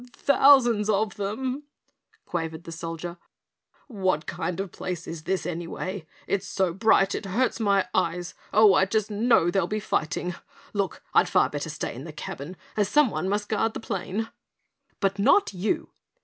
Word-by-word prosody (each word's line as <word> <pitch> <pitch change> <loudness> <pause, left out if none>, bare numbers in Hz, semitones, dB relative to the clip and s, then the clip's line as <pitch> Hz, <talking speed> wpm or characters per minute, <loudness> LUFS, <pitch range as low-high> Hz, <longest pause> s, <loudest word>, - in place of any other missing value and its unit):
"Th 250 - -15
thousands 255 -7 +5
of 210 0 +1
them!" 250 +7 -3 0.6
quavered 165 -1 -4
the 165 - -8
Soldier. 165 +1 -6 0.7
"What 185 - 0
kind 180 0 -3
of 195 -2 -3
place 180 -2 -5
is 165 -1 -7
this, 190 -1 -1
anyway! 175 +1 -4 0.2
It's 200 0 -1
so 190 -3 0
bright 195 0 +3
it - - -4
hurts 235 +6 0
my 200 -3 +2
eyes. 180 -1 0 0.2
Oh, 210 -1 +7
I 190 - +4
just 215 +1 -1
know 210 -5 +3
there'll 190 -2 +1
be 215 +2 -2
fighting! 180 -1 -1 0.4
Look, 200 -4 -2
I'd - - +4
far - - +3
better - - -4
stay - - -4
in - - -8
the - - -8
cabin, 155 +7 -7 0.2
as 205 -2 +1
someone 255 -10 +2
must 205 +1 -1
guard 220 +1 0
the - - -3
plane!" 220 +1 -3 0.7
"But 195 0 0
not 280 - +4
YOU!" 185 +3 -1
195 Hz, 165 wpm, -26 LUFS, 180-220 Hz, 0.7 s, Oh